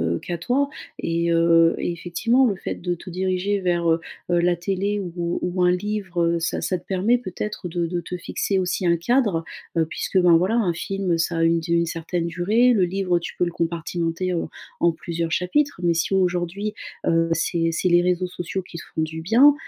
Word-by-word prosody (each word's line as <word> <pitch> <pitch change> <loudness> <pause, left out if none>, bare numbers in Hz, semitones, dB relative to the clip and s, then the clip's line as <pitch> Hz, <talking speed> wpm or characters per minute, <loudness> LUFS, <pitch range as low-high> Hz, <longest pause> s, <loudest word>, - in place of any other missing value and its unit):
heu, - - -3
qu'à 175 -1 -4
toi 270 +11 0 0.3
et 170 0 0
heu 165 0 +5
et 175 - -2
effectivement 230 +10 +1
le 200 -5 0
fait - - -4
de 175 0 -2
te 175 +2 -9
diriger 190 +2 -1
vers, 175 -2 +1
heu 165 0 +2 0.3
heu 175 -1 +3
la 175 0 +2
télé 195 +3 -1
ou 175 -2 -3
ou 180 +1 -1
un 180 - +5
livre, 190 -2 -1
heu 170 0 +1
ça 165 - -1
ça 185 - -1
te 175 - -16
permet 195 +6 +2
peut-être 210 -4 -5
de 170 0 -1
de 175 0 -2
te 180 - -6
fixer 190 +2 -1
aussi 180 0 -1
un 170 0 +3
cadre, 195 -4 +1 0.3
heu, 160 - +3
puisque 185 +4 -1
ben 175 -2 +6
voilà 185 +7 +2
un 200 -8 +2
film 190 0 -1
ça 165 0 0
a 165 - +2
une 165 0 +3
du 170 +1 -5
une 170 0 +2
certaine 165 +1 -3
durée, 215 +9 +3
le 195 -5 +3
livre 180 0 +1
tu - - -6
peux 180 - +2
le 175 - -3
compartimenter 170 +2 -2
en 165 -2 -2 0.3
en 170 - +5
plusieurs 165 0 -4
chapitres. 230 - +1
Mais 170 - +3
si 165 +3 0
aujourd'hui, 185 +2 0 0.3
heu, 165 0 +3
c'est 165 0 +1
c'est 165 +3 0
les 175 0 +5
réseaux 180 +1 +1
sociaux 180 +1 -4
qui 175 - -10
te - - -7
font - - -1
du 160 +1 -3
bien, 245 - +6
175 Hz, 215 wpm, -23 LUFS, 170-190 Hz, 0.3 s, ben